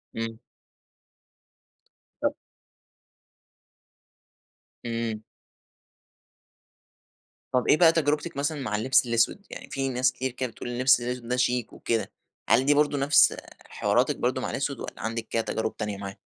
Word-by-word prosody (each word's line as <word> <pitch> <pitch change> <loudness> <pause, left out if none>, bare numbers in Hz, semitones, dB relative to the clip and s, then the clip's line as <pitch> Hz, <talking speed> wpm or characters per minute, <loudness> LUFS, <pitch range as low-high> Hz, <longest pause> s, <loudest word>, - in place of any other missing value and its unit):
امم. 115 0 -4 1.8
ط - - +1 2.5
امم. 115 -2 -3 2.3
طب 125 - +1
ايه - - +5
بقى 165 -1 +7
تجربتِك 150 -1 0
مثلًا 145 0 -1
مع 105 -5 -2
اللبس 130 +4 +3
الأسود؟ 115 - +1
يعني - - -9
في 135 0 -2
ناس 130 0 +2
كتير 130 0 -3
كده 125 0 -3
بتقول 120 - -7
اللبس 125 0 +3
الأسود 125 0 -4
ده 125 - 0
شيك 125 -2 0
وكده، 115 -1 -2 0.4
هل 120 +4 +4
دي 145 - +5
برضه 145 0 +2
نفس 140 +2 +5 0.3
حواراتِك - - +1
برضه - - -1
مع - - -3
الأسود - - -2
والّا - - -7
عندِك 115 0 -3
كده 115 - 0
تجارب 110 0 -3
تانية 105 -2 -3
معاه؟ 100 -1 -7
125 Hz, 135 wpm, -26 LUFS, 115-135 Hz, 2.5 s, بقى